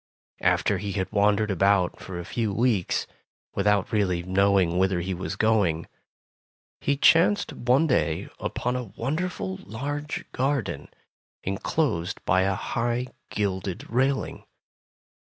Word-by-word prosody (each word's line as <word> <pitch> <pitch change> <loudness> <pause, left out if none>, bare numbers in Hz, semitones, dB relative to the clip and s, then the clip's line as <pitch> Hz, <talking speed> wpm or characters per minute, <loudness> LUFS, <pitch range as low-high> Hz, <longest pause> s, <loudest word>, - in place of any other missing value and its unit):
After - - +2
he 100 -1 -4
had 95 -2 -2
wandered 105 0 +3
about 95 -1 +2
for 95 -2 -7
a 85 - -5
few 110 +1 -1
weeks, 105 -3 +1 0.5
without 100 -1 +2
really 95 -5 +1
knowing 95 -1 +3
whither 95 -1 +2
he 95 +2 -2
was 90 0 -4
going, 100 -7 +2 0.9
he 140 0 0
chanced 170 +8 +4
one 125 +6 +2
day 80 - +1
upon 125 +1 -2
a 125 -1 -2
wonderful 135 - -2
large 145 +8 -4
garden, 120 - -1 0.6
enclosed 95 - -1
by 95 +1 +3
a 95 0 +1
high 120 +3 -1 0.2
gilded 95 -3 -2
railing. 135 +3 0
100 Hz, 120 wpm, -26 LUFS, 95-125 Hz, 0.9 s, chanced